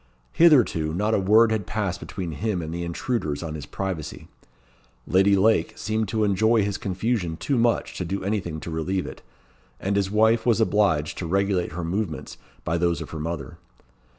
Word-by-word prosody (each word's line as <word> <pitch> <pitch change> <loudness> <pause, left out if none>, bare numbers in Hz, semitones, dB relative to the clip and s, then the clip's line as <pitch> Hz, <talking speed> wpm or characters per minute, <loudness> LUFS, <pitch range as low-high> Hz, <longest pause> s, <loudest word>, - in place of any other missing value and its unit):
Hitherto, 120 - +4
not 105 +4 0
a - - +3
word 110 +4 +5
had 105 -5 -1
passed 100 -1 -2
between 90 -4 -5
him 90 +3 -2
and 80 +1 -5
the 85 0 -3
intruders 85 - -2
on 80 -2 -5
his 75 -2 -7
privacy. 95 -6 -5 0.8
Lady 95 +2 +4
Lake 110 +4 +2
seemed 110 0 -1
to 110 +2 0
enjoy 110 +2 +3
his 100 0 -2
confusion 95 -3 -2
too 140 - -1
much 115 -1 +1
to - - -1
do 95 +3 -3
anything 95 -6 -2
to 85 - -6
relieve 90 +4 -2
it, - - -9 0.6
and 100 +1 -1
his 100 -1 +1
wife 110 +2 +3
was 115 -2 +2
obliged 100 -9 +1
to 85 - -3
regulate 95 -2 0
her 90 +1 -4
movements 85 -1 -3 0.3
by 85 +1 -1
those 85 0 +1
of - - -8
her 80 - -5
mother. 80 -1 -5
95 Hz, 180 wpm, -24 LUFS, 85-110 Hz, 0.8 s, word